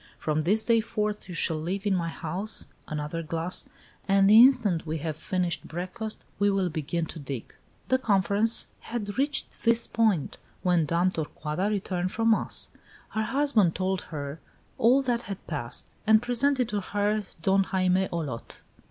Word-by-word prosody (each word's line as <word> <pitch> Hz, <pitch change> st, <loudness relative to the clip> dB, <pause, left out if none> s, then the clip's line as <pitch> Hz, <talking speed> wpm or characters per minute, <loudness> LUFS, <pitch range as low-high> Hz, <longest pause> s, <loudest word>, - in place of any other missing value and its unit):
From 155 Hz, 0 st, -1 dB
this 210 Hz, +7 st, +3 dB
day 230 Hz, -1 st, +4 dB
forth 210 Hz, -3 st, -3 dB
you 180 Hz, -, -6 dB
shall 160 Hz, -1 st, 0 dB
live 190 Hz, +5 st, -3 dB
in 205 Hz, -, +2 dB
my 175 Hz, -3 st, 0 dB
house 180 Hz, +6 st, -1 dB, 0.2 s
another 150 Hz, +2 st, -3 dB
glass 165 Hz, +3 st, -1 dB, 0.4 s
and 195 Hz, 0 st, +4 dB
the 215 Hz, +3 st, +9 dB
instant 235 Hz, -10 st, +4 dB
we 160 Hz, +1 st, -2 dB
have 155 Hz, 0 st, -3 dB
finished 180 Hz, +2 st, -2 dB
breakfast, 185 Hz, +6 st, -5 dB
we 205 Hz, 0 st, +4 dB
will 195 Hz, -2 st, +1 dB
begin 160 Hz, +1 st, -2 dB
to 160 Hz, -, -8 dB
dig." 135 Hz, -5 st, -6 dB, 0.3 s
The 260 Hz, -, +2 dB
conference 205 Hz, 0 st, +3 dB
had 220 Hz, -1 st, -5 dB
reached 290 Hz, +2 st, -1 dB
this 230 Hz, 0 st, +4 dB
point 215 Hz, -9 st, +1 dB, 0.3 s
when 175 Hz, -4 st, +2 dB
Dame 170 Hz, +4 st, +2 dB
Torcuata 160 Hz, +3 st, -3 dB
returned 185 Hz, -3 st, -2 dB
from 225 Hz, 0 st, +2 dB
mass. 220 Hz, -, 0 dB, 0.4 s
Her 220 Hz, -, -2 dB
husband 225 Hz, -, +2 dB
told 190 Hz, 0 st, -1 dB
her 145 Hz, -1 st, -5 dB, 0.4 s
all 255 Hz, +4 st, +5 dB
that 240 Hz, -2 st, 0 dB
had 195 Hz, -4 st, -7 dB
passed, 130 Hz, -7 st, -5 dB
and 220 Hz, 0 st, +7 dB
presented 250 Hz, +2 st, +1 dB
to 205 Hz, -1 st, -1 dB
her 205 Hz, +2 st, 0 dB, 0.2 s
Don 195 Hz, +1 st, +3 dB
Jaime 185 Hz, -1 st, +1 dB
Olot. 145 Hz, -9 st, -5 dB
190 Hz, 160 wpm, -27 LUFS, 165-220 Hz, 0.4 s, the